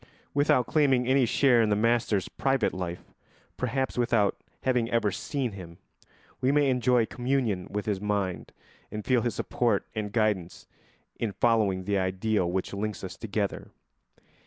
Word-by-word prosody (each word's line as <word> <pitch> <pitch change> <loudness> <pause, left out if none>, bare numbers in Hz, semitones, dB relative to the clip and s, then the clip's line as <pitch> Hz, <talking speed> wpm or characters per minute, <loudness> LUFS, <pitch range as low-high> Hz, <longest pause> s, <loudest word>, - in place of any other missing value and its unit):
Without 145 -3 +3
claiming 135 -5 +2
any 130 -1 +3
share 125 -1 +4
in 110 - +2
the 105 - +3
master's 115 -2 +1
private 135 -4 0
life, 90 -1 -6 0.4
perhaps 130 +1 -2
without 115 -4 +2 0.3
having 125 -3 +1
ever 115 -4 +1
seen 135 +3 -3
him, 85 -4 -10 0.6
we 130 +1 +2
may 145 -2 +3
enjoy 125 -1 +3
communion 120 -7 -1
with 105 +1 -3
his 100 -3 -1
mind 100 -3 -2 0.4
and 105 0 -6
feel 125 -2 +3
his 120 -1 -2
support 115 -5 0
and 105 -2 -3
guidance 105 -6 -1 0.5
in 115 -3 -1
following 100 -4 +2
the 100 +1 0
ideal 95 0 0
which 95 +2 -2
links 105 +1 -4
us 95 -1 -6
together. 105 -2 -3
110 Hz, 150 wpm, -27 LUFS, 100-125 Hz, 0.6 s, share